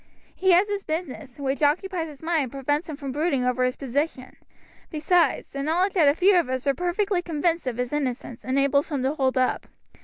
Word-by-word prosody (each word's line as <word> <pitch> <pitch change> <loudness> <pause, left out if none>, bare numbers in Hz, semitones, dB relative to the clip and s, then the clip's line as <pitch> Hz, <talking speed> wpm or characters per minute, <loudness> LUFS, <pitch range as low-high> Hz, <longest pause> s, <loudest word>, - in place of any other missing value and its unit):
He 380 - 0
has 365 +4 +5
his 405 -1 -3
business, 310 -5 -5
which 275 0 -2
occupies 330 +3 +1
his 295 -1 -12
mind 330 -1 +1
and 260 -4 -4
prevents 290 +4 -2
him 305 - -4
from 280 -2 -6
brooding 280 -2 0
over 250 0 +1
his 255 0 0
position; 275 0 -3 0.5
besides, 330 +3 +1
the 275 - -4
knowledge 350 +7 +1
that 330 -6 +4
a 285 - +2
few 380 +3 +4
of 335 -7 +1
us 260 +1 -2
are 275 - +3
perfectly 360 +4 0
convinced 330 -2 -1
of 240 -2 -2
his 250 +2 -3
innocence 255 -5 -3
enables 275 +4 +1
him 280 -5 -2
to 270 +2 +1
hold 265 -3 0
up. 255 0 0
290 Hz, 210 wpm, -25 LUFS, 265-345 Hz, 0.5 s, has